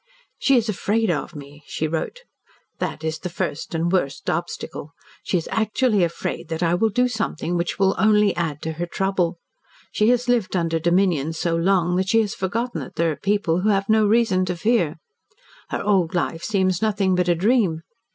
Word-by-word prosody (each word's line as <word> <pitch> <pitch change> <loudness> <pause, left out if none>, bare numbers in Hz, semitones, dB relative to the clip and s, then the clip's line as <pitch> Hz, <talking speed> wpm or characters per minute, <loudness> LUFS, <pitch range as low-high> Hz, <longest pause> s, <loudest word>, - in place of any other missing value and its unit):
"She 275 - +3
is 230 -1 +1
afraid 215 +1 0
of 155 - -3
me," 145 0 -11
she 155 - -2
wrote. 165 - -3 0.6
"That 155 - -3
is 160 0 -2
the 180 - -5
first 170 -2 -4
and 165 +1 0
worst 145 -7 0
obstacle. 155 - -5 0.3
She 185 - 0
is 165 - -4
actually 220 -1 +2
afraid 170 -1 -3
that 160 +1 -2
I 170 0 +2
will 220 +5 +2
do 250 +4 +2
something 215 -7 -2
which 170 0 -1
will 195 0 +3
only 210 0 +4
add 160 -4 -3
to 160 - -2
her 175 - -1
trouble. 185 -2 -1 0.5
She 215 +2 +2
has 245 0 +2
lived 235 -6 +1
under 165 -2 0
dominion 170 -3 +1
so 165 +1 -1
long 180 0 +2
that 190 +1 0
she 225 -1 +4
has 210 -2 -2
forgotten 230 +6 -2
that - - -9
there 165 0 +1
are - - -3
people 195 -3 0
who 210 - +2
have 195 -1 +1
no 215 -1 +4
reason 210 -4 +3
for 180 -1 -2
fear. 185 -4 +1 0.7
Her - - -3
old 190 -4 +1
life 165 -1 -1
seems 185 -4 +1
nothing 205 -3 +1
but 180 -1 +1
a 175 - +4
dream. 190 -4 +1
185 Hz, 195 wpm, -22 LUFS, 165-215 Hz, 0.7 s, only